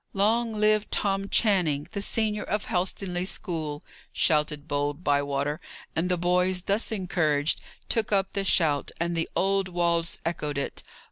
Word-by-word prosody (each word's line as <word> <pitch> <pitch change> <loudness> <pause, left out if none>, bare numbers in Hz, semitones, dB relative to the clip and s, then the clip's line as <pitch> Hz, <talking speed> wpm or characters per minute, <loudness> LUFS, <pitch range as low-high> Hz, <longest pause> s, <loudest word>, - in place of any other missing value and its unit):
"Long 225 +4 +2
live 215 0 +2
Tom 195 -1 0
Channing, 175 -10 +2
the 200 - -3
senior 210 0 +1
of 210 0 -2
Helstonleigh 180 0 -1
school!" 160 -7 -3 0.3
shouted 150 -1 +1
bold 145 +3 -2
Bywater; 145 +1 0 0.3
and 170 +3 0
the 180 - +2
boys, 180 +1 +1
thus 200 +5 0
encouraged, 165 -7 0 0.3
took 220 -2 +1
up 195 -1 +2
the 200 - -1
shout, 155 -6 +2
and 170 +1 -1
the 165 - -1
old 195 0 +2
walls 170 -2 0
echoed 150 -4 -2
it. 140 - -2
180 Hz, 145 wpm, -27 LUFS, 150-200 Hz, 0.3 s, Long